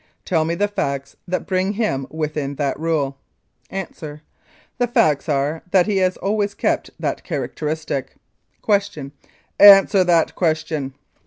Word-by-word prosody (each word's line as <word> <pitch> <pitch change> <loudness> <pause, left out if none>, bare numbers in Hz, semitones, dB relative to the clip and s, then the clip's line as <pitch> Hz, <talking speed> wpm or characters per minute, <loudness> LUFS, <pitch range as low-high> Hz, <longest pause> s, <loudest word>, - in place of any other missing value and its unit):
Tell 160 -3 +1
me 165 +1 -1
the 205 +4 +1
facts 140 -8 -3
that 185 +1 -2
bring 190 +1 0
him 200 - -1
within 150 -3 -3
that 140 0 -2
rule? 150 -4 -1 0.5
A. 195 -1 -3
The 205 - -8
facts 150 -7 +2
are 145 +2 0
that 180 -1 +4
he 205 -1 0
has 185 -1 +1
always 205 0 -1
kept - - -1
that - - -3
characteristic. 150 -3 -4 0.5
Q. 200 -9 0 0.5
Answer 195 -1 +8
that 170 -2 +2
question. 155 -5 -1
160 Hz, 135 wpm, -20 LUFS, 145-195 Hz, 0.5 s, Answer